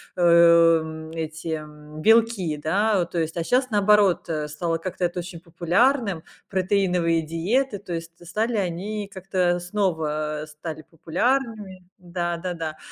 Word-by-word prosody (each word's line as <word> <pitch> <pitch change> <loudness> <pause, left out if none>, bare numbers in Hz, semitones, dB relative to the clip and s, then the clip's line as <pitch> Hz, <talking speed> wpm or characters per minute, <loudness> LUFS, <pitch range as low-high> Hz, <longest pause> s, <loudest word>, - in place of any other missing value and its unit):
эм, 165 -2 +4
эти, 160 0 -6 0.2
м, 150 0 -12
белки, 225 -7 +3
да. 195 +6 +1
Э, - - -4
то 175 - -6
есть, 160 +1 -2
а 165 - 0
щас, 255 +5 +1
наоборот, 205 -4 +3
э, 150 -2 -2
стало 165 +2 -2
как-то 180 +1 -3
это 175 +1 -3
очень 175 -1 -7
популярным. 180 - +1 0.2
Протеиновые 180 -3 +1
диеты, 200 - -1
то 185 -4 -7
есть 165 0 -5
стали 220 +6 -1
они 200 +3 -3
как-то 185 -2 0
снова 160 -5 -2
стали 155 +1 -8
популярными. 195 - -2
Да, 175 -1 -3
да-да. 165 -3 -4
175 Hz, 135 wpm, -24 LUFS, 160-200 Hz, 0.2 s, эм